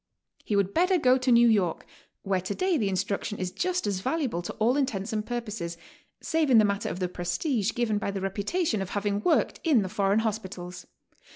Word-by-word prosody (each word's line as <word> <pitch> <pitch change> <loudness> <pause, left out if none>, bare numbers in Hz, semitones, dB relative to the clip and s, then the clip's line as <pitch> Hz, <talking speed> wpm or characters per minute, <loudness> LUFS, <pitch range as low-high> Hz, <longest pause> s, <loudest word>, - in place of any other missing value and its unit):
He 210 - -1
would 200 -1 +1
better 365 +2 +3
go 255 -4 +4
to 255 0 +1
New 235 0 +6
York, 200 -7 +1 0.4
where 190 -1 0
today 345 - 0
the 215 -9 +1
instruction 200 +2 -2
is 185 -1 -3
just 365 - -1
as 200 -3 -1
valuable 260 - -1
to 175 - -6
all 230 +4 +2
intents 225 -7 -1
and 215 -1 -1
purposes, 210 -8 -4 0.4
save 320 -2 0
in 245 - +6
the 215 - +6
matter 200 0 -1
of 170 - -4
the 185 -1 -1
prestige 190 - -1
given 220 -4 0
by 200 - -2
the 195 0 -3
reputation 205 - -1
of 190 - -4
having 205 0 -1
worked 330 - +1
in 280 - +4
the 190 - -4
foreign 200 +1 +1
hospitals. 190 -4 -5
210 Hz, 200 wpm, -27 LUFS, 195-250 Hz, 0.4 s, New